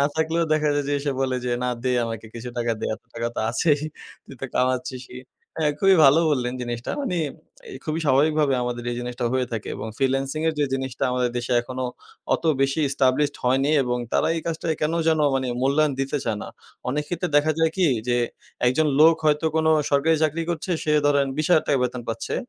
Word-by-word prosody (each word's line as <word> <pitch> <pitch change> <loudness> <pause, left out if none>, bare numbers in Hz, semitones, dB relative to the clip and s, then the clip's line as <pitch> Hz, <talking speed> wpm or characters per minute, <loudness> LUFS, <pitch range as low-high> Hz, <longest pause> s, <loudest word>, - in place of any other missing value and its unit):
না 140 - +4
থাকলেও 160 +1 +1
দেখা 155 -1 +2
যায়, 145 -1 0
যে 145 - +1
সে 145 - +1
বলে 130 -1 0
যে, 125 - -1
না 125 - 0
দে 130 -1 +1
আমাকে 115 -1 -6
কিছু 120 +1 -6
টাকা 120 -1 0
দে। - - -3
এত - - -17
টাকা 115 0 -2
তো - - -2
আছেই। 145 +5 +2 0.5
তুই 135 - -11
তো 135 - -3
কামাচ্ছিসই 125 0 -2 0.4
হ্যাঁ, 150 -2 +2
খুবই 195 +2 +5
ভালো 140 +4 +7
বললেন 125 -3 0
জিনিসটা। 120 -1 -4
মানি 180 -11 -1 0.5
এ - - -8
খুবই 155 +1 -2
স্বাভাবিকভাবে 145 +1 +3
আমাদের 120 -1 -3
এই 120 - -3
জিনিসটা 125 0 -4
হয়ে 130 -1 +1
থাকে 110 -2 -4
এবং - - -5
ফ্রিল্যান্সিং 135 +2 0
এর - - +1
যে 145 - +3
জিনিসটা 130 -2 -3
আমাদের 125 -1 0
দেশে 120 +1 -2
এখনো 130 +1 -5 0.5
অত - - -4 0.2
বেশি 135 +3 +1
ইস্টাবলিশড 140 +1 +1
হয়নি 135 +3 +2
এবং 125 -1 -1
তারা - - +2
এই - - -2
কাজটা 165 0 -3
কেন 155 +1 0 0.2
যেন 160 -1 +3
মানি 130 -1 0 0.2
মূল্যায়ন 145 +2 +2
দিতে 135 +2 -1
চায় 110 -3 -1
না। - - -7 0.4
অনেক 150 +3 -1
ক্ষেত্রে 175 0 -2
দেখা 155 +2 +3
যায় 160 0 +3
কি? 185 -3 +3 0.2
যে 120 - +2 0.5
একজন 140 +6 +3
লোক 165 +1 +8
হয়তো 150 +1 +2
কোনো 160 0 +3 0.2
সরকারি 145 +3 +3
চাকরি 155 +2 +1
করছে, 170 +2 -4
সে 150 - +1
ধরেন 140 -1 +3
৳২০,০০০ 155 -3 +3
বেতন 125 0 -3
পাচ্ছে। 115 0 -3
135 Hz, 205 wpm, -24 LUFS, 125-155 Hz, 0.5 s, লোক